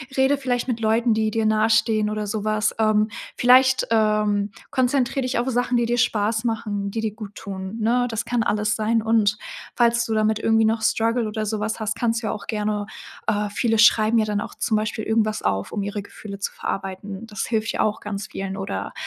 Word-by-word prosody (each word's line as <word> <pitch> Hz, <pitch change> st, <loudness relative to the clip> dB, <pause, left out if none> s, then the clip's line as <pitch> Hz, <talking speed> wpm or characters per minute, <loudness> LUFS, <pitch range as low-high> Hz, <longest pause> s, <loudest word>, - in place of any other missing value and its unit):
rede 270 Hz, +1 st, +3 dB
vielleicht 250 Hz, -2 st, -1 dB
mit 235 Hz, -2 st, -1 dB
Leuten, 225 Hz, +1 st, +2 dB
die 220 Hz, 0 st, +1 dB
dir 225 Hz, 0 st, 0 dB
nahestehen 215 Hz, 0 st, +2 dB
oder 215 Hz, 0 st, -2 dB
so 210 Hz, 0 st, -3 dB
was. 215 Hz, 0 st, +1 dB
Ähm, 215 Hz, 0 st, +3 dB, 0.3 s
vielleicht, 255 Hz, +1 st, +5 dB
ähm, 210 Hz, -2 st, +2 dB, 0.2 s
konzentriere 260 Hz, 0 st, +1 dB
dich 255 Hz, -1 st, -1 dB
auf 245 Hz, +2 st, -1 dB
Sachen, 245 Hz, 0 st, 0 dB
die 235 Hz, -, +2 dB
dir 240 Hz, 0 st, 0 dB
Spaß 220 Hz, -1 st, +1 dB
machen, 210 Hz, -3 st, -2 dB
die 225 Hz, -, -3 dB
dir 220 Hz, -2 st, -2 dB
gut 210 Hz, -2 st, -9 dB
tun, 190 Hz, +2 st, -6 dB
ne? 245 Hz, +3 st, +2 dB
Das 225 Hz, 0 st, -2 dB
kann 240 Hz, -2 st, 0 dB
alles 210 Hz, +1 st, 0 dB
sein 225 Hz, +1 st, +1 dB
und 220 Hz, -2 st, +2 dB, 0.4 s
falls 235 Hz, -1 st, +3 dB
du 225 Hz, -, -2 dB
damit 215 Hz, 0 st, +1 dB
irgendwie 225 Hz, 0 st, +3 dB
noch 220 Hz, 0 st, +1 dB
Struggle 230 Hz, +1 st, +1 dB
oder 215 Hz, 0 st, -3 dB
so 215 Hz, 0 st, -2 dB
was 220 Hz, +2 st, -2 dB
hast, 220 Hz, +1 st, -1 dB
kannst 230 Hz, -1 st, 0 dB
du -, -, -1 dB
ja -, -, 0 dB
auch 210 Hz, -, -7 dB
gerne 210 Hz, -1 st, -1 dB, 0.4 s
äh, 205 Hz, -1 st, 0 dB
viele 225 Hz, +1 st, 0 dB
schreiben 225 Hz, 0 st, +5 dB
ja 215 Hz, -, +2 dB
dann 210 Hz, -1 st, -1 dB
auch -, -, -7 dB
zum 215 Hz, -, 0 dB
Beispiel 215 Hz, 0 st, -2 dB
irgendwas 215 Hz, -1 st, 0 dB
auf, 95 Hz, 0 st, -1 dB
um 205 Hz, -, -2 dB
ihre 205 Hz, +1 st, -3 dB
Gefühle 200 Hz, 0 st, -10 dB
zu 200 Hz, -, -3 dB
verarbeiten. 195 Hz, +2 st, -5 dB
Das 215 Hz, 0 st, -4 dB
hilft 225 Hz, 0 st, -1 dB
ja -, -, 0 dB
auch 215 Hz, -1 st, 0 dB
ganz 205 Hz, 0 st, -5 dB
vielen 195 Hz, -1 st, -5 dB
oder 195 Hz, +1 st, -4 dB
220 Hz, 215 wpm, -23 LUFS, 210-230 Hz, 0.4 s, vielleicht